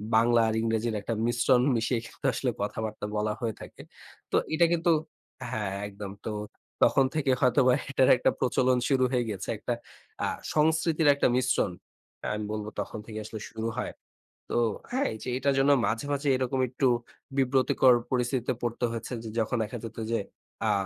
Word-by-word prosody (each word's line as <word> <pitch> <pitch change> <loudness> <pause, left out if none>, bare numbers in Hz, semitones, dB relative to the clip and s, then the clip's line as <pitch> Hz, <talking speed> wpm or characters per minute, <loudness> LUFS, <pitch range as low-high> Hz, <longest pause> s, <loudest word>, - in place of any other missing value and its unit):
বাংলা 115 +1 +5
আর 110 - 0
ইংরেজির 115 0 0
একটা 115 - -3
মিশ্রণ 120 +2 +3
মিশিয়ে 115 +1 +1
কিন্তু - - -11
আসলে 125 - -1
কথাবার্তা 105 +1 -3
বলা 105 0 0
হয়ে 115 -2 -2
থাকে। - - -11 0.5
তো - - +1 0.2
এটা 170 +2 +5
কিন্তু 170 0 +2 0.6
হ্যাঁ 105 -3 -2
একদম। 100 0 -7
তো 110 - -2 0.6
তখন 135 - +3
থেকে 140 -4 +2
হয়তোবা 125 0 +4 0.2
এটার 130 -1 +4
একটা - - +2
প্রচলন 130 0 +2
শুরু 130 -2 +3
হয়ে 125 -2 +2
গিয়েছে। 100 -4 -5
একটা - - -2 0.5
আ - - +1 0.3
সংস্কৃতির 160 0 +2
একটা - - +3
মিশ্রণ। 125 -6 +2 0.6
আমি 105 0 -3
বলব 105 -1 -3
তখন 105 +2 -4
থেকে 110 -1 -6
আসলে 110 0 -6
শুরু 110 0 -4
হয়। - - -2 0.6
তো - - 0 0.3
হ্যাঁ 260 +3 +1
এইযে 110 +3 -6
এটার 140 +1 +1
জন্য 140 +1 +4
মাঝে, 110 +5 -1
মাঝে 140 +1 -2
এরকম 130 +1 -1
একটু 130 +1 +1 0.5
বিব্রতকর 130 -1 +4 0.2
পরিস্থিতিতে 125 0 0
পড়তে 120 +1 -1
হয়েছে 115 +2 -5
যে 110 - -6
যখন 115 +2 0
দেখা 115 +3 -5
যেত 115 0 -8
যে 115 - +2 0.5
আ - - +3
120 Hz, 165 wpm, -28 LUFS, 110-130 Hz, 0.6 s, বাংলা